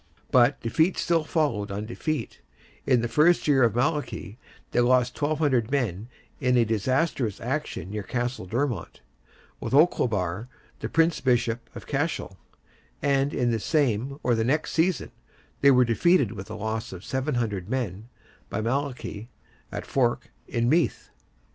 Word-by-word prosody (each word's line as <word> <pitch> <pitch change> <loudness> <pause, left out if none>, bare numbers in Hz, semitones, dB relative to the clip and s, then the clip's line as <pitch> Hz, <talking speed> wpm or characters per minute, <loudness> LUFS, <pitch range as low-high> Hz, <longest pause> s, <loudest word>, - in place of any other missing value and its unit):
But 125 +2 +4
defeat 160 +10 +1
still 165 -2 +1
followed 145 -11 0
on 100 +2 -4
defeat; 120 - -4 0.5
in 125 -3 +4
the 120 - -1
first 155 +8 +3
year 140 -3 +4
of 115 -3 +3
Malachy, 130 - -2 0.3
they - - +1
lost 125 +2 +2
1,200 145 -6 +1
men 120 -6 -1 0.3
in 125 -2 +2
a 120 - +4
disastrous 120 - 0
action 130 -6 -3
near 105 0 -3
Castle 120 -1 -3
Dermot, 120 - -2 0.6
with - - -2
Olcobar 110 - +2 0.3
the - - -4
Prince 165 0 +2
bishop 120 -2 0
of - - -8
Cashel; 145 -8 -2 0.7
and 140 0 +2
in 120 -1 +1
the 115 - 0
same 135 0 0
or 125 - +2
the 115 -1 +1
next 145 +7 0
season 170 +1 +1 0.5
they 140 - +7
were 125 -2 +6
defeated 130 - +3
with 95 -4 -7
the - - -7
loss 110 +1 -3
of 95 +1 -9
700 120 -9 -2
men, 115 -4 -3 0.4
by - - -3
Malachy, 120 -2 -3 0.4
at - - -5
Fore, 120 -3 +2 0.3
in 120 -1 0
Meath. 165 +6 +1
125 Hz, 150 wpm, -26 LUFS, 110-145 Hz, 0.7 s, they